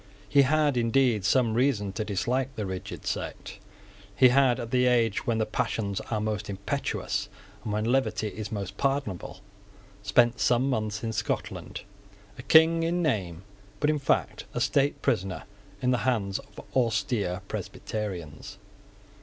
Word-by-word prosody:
He 140 - +5
had 145 0 +2
indeed 120 -2 +2
some 120 -1 +3
reason 115 -5 +1
to 110 - -2
dislike 125 +6 -1
the 105 - -3
rigid 95 -1 -6
sect. - - -5 0.6
He 130 -2 +7
had, 130 -1 +4
at 115 -1 -6
the 125 -1 +3
age 115 -4 +2
when 115 -2 +1
the 110 - +1
passions 110 -3 -2
are 110 - 0
most 105 -1 -3
impetuous 100 0 -2 0.3
and 105 - -4
when 105 +1 -1
levity 110 -4 +1
is 105 0 -7
most 100 -2 -5
pardonable, 135 -9 -2 0.6
spent 120 +3 +3
some 125 +2 +3
months 110 -2 -2
in 110 -1 -2
Scotland, - - -3 0.6
a - - -4
King 160 +4 +5
in 175 +2 0
name, 95 - -1 0.4
but 150 +1 +3
in 150 - -1
fact 135 - 0
a - - 0
state 140 0 +1
prisoner 95 0 0 0.4
in 125 - +3
the 125 - +2
hands 105 -7 0
of - - -14 0.2
austere 110 -6 0
Presbyterians. 90 -12 -5
115 Hz, 150 wpm, -27 LUFS, 105-130 Hz, 0.6 s, He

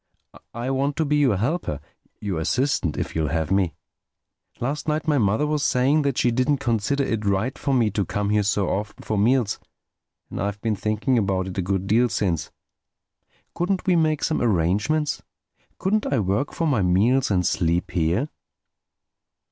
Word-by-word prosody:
I 120 +3 -3
want 140 +2 0
to 160 - 0
be 150 +1 +1
your 135 -9 +3
helper—your 100 - -4
assistant, 95 - 0
if - - -4
you'll 80 -1 0
have 80 +1 -1
me. 95 -6 +1 0.8
Last 140 +6 -3
night 155 +1 -1
my 150 -3 +3
mother 110 +6 +2
was 150 -1 0
saying 135 +5 +3
that 140 -3 -1
she 120 - +3
didn't 130 +4 +2
consider 130 +2 0
it 115 -5 -2
right 100 +6 0
for 140 - -2
me 120 -5 +2
to 100 0 0
come 100 +3 -2
here 105 0 +3
so 100 -1 +1
often 105 +3 -3
for 110 - -2
meals. 115 +1 +2 0.7
And - - -4
I've 100 0 -2
been 110 0 -1
thinking 110 +5 0
about 95 -2 -1
it 90 - -8
a - - +2
good 95 +1 -1
deal 115 +5 +3
since. 90 -7 -1 1.0
Couldn't 185 +2 -1
we 185 - +3
make 155 -2 +1
some 160 - 0
arrangement—couldn't 135 - -1
I 140 - +2
work 100 +6 0
for 165 - -2
my 140 -9 +2
meals 105 +9 +3
and 90 -3 +1
sleep 85 -1 0
here?" 90 - +1
110 Hz, 170 wpm, -23 LUFS, 95-140 Hz, 1.0 s, your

